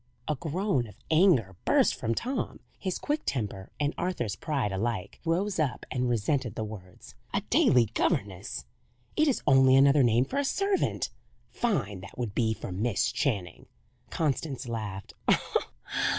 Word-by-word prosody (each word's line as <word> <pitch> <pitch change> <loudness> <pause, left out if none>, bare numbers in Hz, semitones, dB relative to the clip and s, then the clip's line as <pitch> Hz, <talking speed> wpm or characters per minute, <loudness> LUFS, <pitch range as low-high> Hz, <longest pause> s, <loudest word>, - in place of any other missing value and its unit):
A 155 - +2
groan 165 - -1
of 105 - -13 0.2
anger 155 - +4
burst - - +4
from 115 +1 -2
Tom. 255 - -2 0.2
His 185 -2 -2
quick 295 +1 -1
temper, 100 -6 -3
and 145 0 +1
Arthur's 145 - -1
pride, 135 -4 -1
alike 100 -1 -2
rose 180 +4 0
up 145 -6 -1
and 125 -1 0
resented 120 +1 0
the 110 - -2
words. 100 -4 -10 0.2
"A - - +2
daily 125 -2 +5
governess! 100 - -1 0.5
It 310 - +3
is 275 - +1
only 135 -2 +6
another 140 +1 +6
name 120 0 +4
for 280 - -2
a - - +2
servant. 395 +7 0 0.4
Fine, 135 - -1
that 100 - -11
would 120 -5 -3
be, 110 -1 +2
for - - -7
Miss 105 +4 0
Channing!" 100 - -2 0.4
Constance 145 -4 -1
laughed. 105 -4 -5
125 Hz, 150 wpm, -29 LUFS, 105-160 Hz, 0.5 s, only